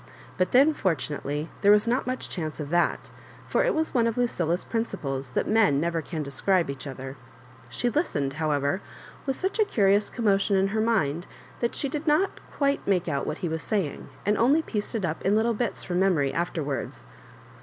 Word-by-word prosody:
But 185 - 0
then, 280 +5 +6
for 185 - +1
tunately, 145 +2 -4
there 200 - +6
was 210 +2 +5
not 250 +3 +1
much 255 0 -2
chance 155 -4 -4
of 150 -1 -5
that; 175 0 +1 0.4
for - - +2
it - - +1
was 315 0 0
one 235 -2 +3
of 230 - -2
Lucilla's 180 -8 0
principles 140 - -3
that - - 0
men 210 -10 +4
never 165 +1 0
can 160 -1 -4
describe 165 +4 +1
each 140 +1 -7
other. 135 0 -7 0.5
She 245 - -1
listened, 190 - 0
however, 145 +3 +1 0.5
with 270 - 0
such 380 - -2
a - - +7
curious 205 - +2
commotion 200 -3 +2
in 195 +1 +2
her 220 +2 0
mind, 175 -8 +1 0.3
that 235 - -1
she 285 - -1
did 300 +3 -4
not 310 +6 +2
quite 280 -1 0
make 185 -3 +2
out 140 -4 -1
what 150 - -2
he - - +1
was 160 0 -2
saying, 195 -10 -2 0.2
and 205 +1 +2
only 285 +7 +4
pieced 210 -3 -3
it 210 -5 0
up 160 -1 -3
in 200 +2 +3
little 225 +2 +2
bits 230 -1 -2
fh)m 175 -1 -2
memo 185 -5 +3
ry 140 - +1
afterwards. 160 -5 -3
195 Hz, 200 wpm, -26 LUFS, 155-235 Hz, 0.5 s, a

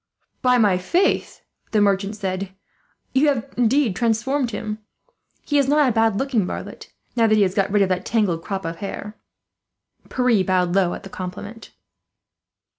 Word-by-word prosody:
"By 250 -1 +4
my 205 -6 +3
faith!" 355 - 0 0.3
the 215 - +4
merchant 200 0 +1
said, 190 -1 -4 0.6
"you 275 +3 +3
have 270 -6 -1
indeed 245 -2 +2
transformed 240 +4 0
him. 215 -1 -5 0.7
He 290 -1 +2
is 275 - +2
not 295 0 +4
a - - +3
bad 225 -2 +2
looking 260 -4 +1
varlet, - - -7 0.2
now 230 -2 +4
that 215 - +4
he 210 - +4
has 185 -1 0
got 195 -1 +1
rid 205 -1 +4
of 190 - 0
that 185 0 -1
tangled 185 -8 0
crop 195 -3 -4
of 165 0 -4
hair." 205 +1 -6 0.9
Pierre 250 -6 +2
bowed 180 -2 +1
low 185 -2 +2
at - - -10
the 195 - -9
compliment. 195 +5 -7
215 Hz, 170 wpm, -22 LUFS, 190-245 Hz, 0.9 s, By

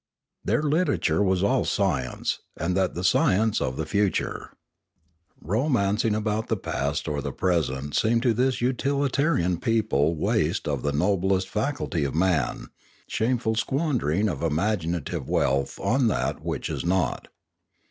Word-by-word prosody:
Their 115 +9 +1
literature 150 - +1
was 95 -2 +2
all 130 +5 +2
science, 85 -11 -1 0.2
and 90 +2 -1
that 95 -1 0
the 90 - -3
science 110 - +3
of 65 - -2
the 80 - -2
future. 100 +4 -1 0.9
Romancing 110 - +1
about 110 +1 -1
the 110 - 0
past 70 -4 -2
or 75 -2 -2
the - - -4
present 75 -6 -1
seemed 115 +1 +2
to 120 -3 +3
this 125 +3 0
utilitarian 135 - +1
people 90 -9 +1
waste 75 - 0
of 70 -4 -1
the 70 - 0
noblest 95 +4 +1
faculty 105 - -1
of 70 +1 -2
man, 85 -5 0 0.4
shameful 115 -1 0
squandering 115 - 0
of 80 -9 -3
imaginative 85 -2 -1
wealth 70 +1 0
on 130 0 +2
that 110 - -1
which - - -3
is - - -3
naught. 85 -7 0
95 Hz, 135 wpm, -25 LUFS, 80-115 Hz, 0.9 s, science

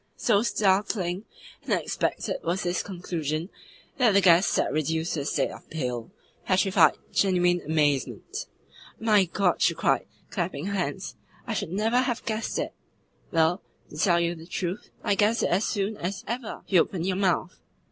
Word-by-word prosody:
So 210 -4 +3
startling 195 -3 +1 0.4
and - - -1
unexpected - - -1
was 175 +3 -1
this 175 0 0
conclusion 170 -3 -4 0.5
that 240 -5 +4
the 200 - +6
guest 180 0 +6
sat - - +1
reduced 160 +2 0
to 155 - -1
a 140 - -3
state - - 0
of - - -13
pale, 125 -6 -3 0.3
petrified, 190 0 +4 0.2
genuine 180 -2 +3
amazement. 150 -4 -1 0.5
"My 215 -3 +4
God!" 180 +1 0
she - - +3
cried, - - +1 0.2
clapping 175 -4 -2
her 200 - -2
hands, 175 -8 -3 0.3
"I - - -3
should - - -3
NEVER 220 +6 +2
have 250 -2 -1
guessed 220 0 -2
it!" - - -2 0.6
"Well, 165 +3 +2 0.3
to - - -10
tell 170 +1 +3
you 170 0 +1
the 165 -1 -11
truth, 180 +2 -4
I 205 - +2
guessed 210 +4 +2
it - - +2
as 190 +5 +2
soon 205 0 -1
as 190 +2 -4
ever 235 -1 -5
you 185 -4 +5
opened 175 -1 -2
your 190 -1 0
mouth." 185 -2 0
185 Hz, 165 wpm, -26 LUFS, 165-205 Hz, 0.6 s, the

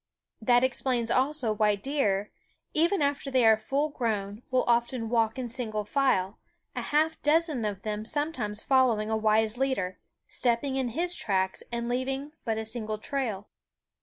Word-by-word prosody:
That 245 +2 +4
explains 250 -2 0
also 260 -3 +1
why 210 -1 +2
deer, 205 -4 -1 0.4
even 335 +2 +2
after 280 0 -1
they 260 -3 +3
are 220 0 +7
full 275 +7 -1
grown, 215 -6 -3
will 255 -1 +2
often 235 -1 +1
walk 225 0 +2
in 255 -2 -3
single 220 -3 -3
file, 210 -6 +1 0.4
a - - -2
half 315 +2 0
dozen 300 -5 +2
of 205 -2 -4
them 215 0 -3
sometimes 240 -7 0
following 240 -5 +2
a - - +2
wise 220 +1 +2
leader, 230 -9 -1 0.3
stepping 255 +3 0
in 260 -2 0
his 350 +1 +1
tracks 190 - -1
and 235 0 -2
leaving 265 +4 -2
but 225 -2 -1
a 220 - -3
single 215 -1 -4
trail. 215 -4 -3
240 Hz, 160 wpm, -28 LUFS, 215-270 Hz, 0.4 s, are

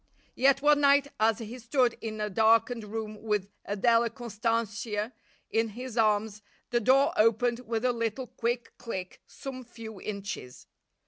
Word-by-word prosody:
Yet 275 +2 +3
one 295 0 +5
night 280 0 +5
as 220 0 +3
he 230 +2 -7
stood 245 0 +2
in 215 -1 -5
a 210 - 0
darkened 225 +2 +3
room 215 0 -5
with 210 -3 -1
Adela 230 +3 +3
Constantia 225 -1 -2 0.4
in 225 0 +2
his 250 -2 -6
arms 215 -1 +1 0.3
the 240 - +3
door 265 +5 +4
opened 230 +2 +3
with 225 +1 -1
a 250 - +3
little 230 +2 -2
quick 240 0 -3
click 190 -6 -6
some 260 -2 -8
few 225 -4 -10
inches. 200 -11 -6
230 Hz, 145 wpm, -29 LUFS, 215-245 Hz, 0.4 s, one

